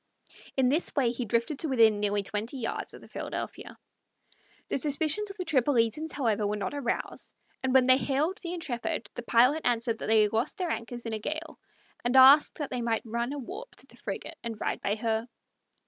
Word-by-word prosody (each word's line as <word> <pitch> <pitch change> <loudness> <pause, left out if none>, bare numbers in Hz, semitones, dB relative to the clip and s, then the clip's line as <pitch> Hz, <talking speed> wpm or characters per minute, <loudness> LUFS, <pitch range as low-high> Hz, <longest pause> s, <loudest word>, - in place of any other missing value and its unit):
In 260 -2 +4
this 310 +6 +1
way 260 -5 +2
he 245 0 -3
drifted 235 +6 -1
to 320 - -1
within 225 -5 +4
nearly 205 -1 0
twenty 210 +6 -3
yards 235 - -4
of - - -13
the - - -14
Philadelphia. - - -6 0.9
The - - 0
suspicions 310 +8 +1
of 395 - -9
the 365 - -4
Tripolitans, 275 +1 +1
however, 220 -6 0
were 210 - -1
not 200 +2 -3
aroused, 280 -5 -4 0.3
and 260 - 0
when 260 -1 +5
they 255 0 +6
hailed 295 +8 0
the 345 -2 -5
Intrepid, 240 -8 -3
the - - -5
pilot 250 +6 +4
answered 235 -1 0
that - - -4
they 220 -1 +6
had 210 - -1
lost 230 +7 0
their 360 -3 -1
anchors 240 +1 -5
in 225 - -3
a 215 - -2
gale, 315 +8 -5 0.4
and 240 +2 0
asked 270 +3 +8
that 295 -3 -4
they 250 -1 -2
might 230 -1 -1
run 235 +3 -2
a 290 - -4
warp 380 - -8
to - - -15
the - - -19
frigate - - -6
and 230 -2 -5
ride - - -2
by 200 - 0
her. 225 +1 -1
245 Hz, 210 wpm, -28 LUFS, 225-290 Hz, 0.9 s, asked